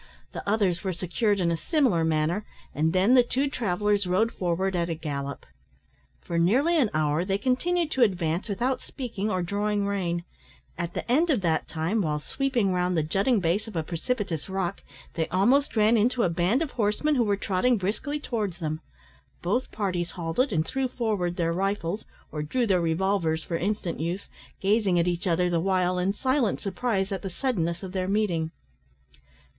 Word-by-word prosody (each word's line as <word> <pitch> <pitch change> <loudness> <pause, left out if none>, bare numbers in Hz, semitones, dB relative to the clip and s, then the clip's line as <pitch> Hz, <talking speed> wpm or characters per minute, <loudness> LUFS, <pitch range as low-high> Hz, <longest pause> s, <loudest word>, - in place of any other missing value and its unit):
The - - -5
others 200 -5 +1
were 190 -2 -1
secured 200 +4 0
in 170 -2 +2
a - - +1
similar 240 - +2
manner, 160 +5 +1 0.3
and 155 +2 +1
then 190 +7 +4
the 255 - +8
two 260 +3 0
travellers 205 -5 0
rode 210 +6 +2
forward 185 +1 -1
at 170 -1 0
a 165 - -1
gallop. 140 -3 -5 0.8
For 170 - -2
nearly 260 - +3
an 275 -9 +3
hour 155 +1 +1
they 195 +1 0
continued 315 - 0
to 265 - 0
advance 180 -3 +1
without 245 +6 0
speaking 220 -5 -4
or 185 -3 0
drawing 205 +2 0
rein. 175 -4 -1 0.5
At 170 -1 -4
the - - -3
end 320 +7 +3
of 260 -9 +2
that 165 -3 0
time, 170 +8 -1
while 155 -4 0
sweeping 240 - 0
round 180 -1 +1
the 160 - +2
jutting 200 +9 +2
base 180 +6 0
of 220 - -9
a 160 - 0
precipitous 180 - -3
rock, 190 -1 -2 0.3
they 160 -1 -1
almost 245 +11 +2
ran 215 +1 +4
into 235 +2 +2
a - - +3
band 180 - +1
of 300 - -5
horsemen 225 +7 +1
who 250 -4 +3
were 205 -2 +1
trotting 205 +6 +1
briskly 215 +10 -2
towards 215 - -3
them. 155 -2 -3 0.6
Both 225 +9 0
parties 180 -4 -1
halted, 175 +11 0
and 160 -4 +1
threw 265 +7 -1
forward 215 -8 -1
their 170 -2 0
rifles, 195 +1 -1 0.3
or 150 - -3
drew 235 +12 0
their 190 -5 +2
revolvers 165 -1 +1
for 170 - -3
instant 190 0 -2
use, 170 +5 -3 0.3
gazing 200 -2 +3
at 170 0 +2
each 175 +2 -1
other 180 +1 +2
the 175 -1 +1
while 185 0 +1
in 185 +2 +1
silent 260 +1 +1
surprise 200 -1 -1
at 190 -2 -2
the 195 - -4
suddenness 175 -6 -1
of 190 - -5
their 185 -1 -2
meeting. 190 -6 +1
190 Hz, 185 wpm, -27 LUFS, 170-225 Hz, 0.8 s, the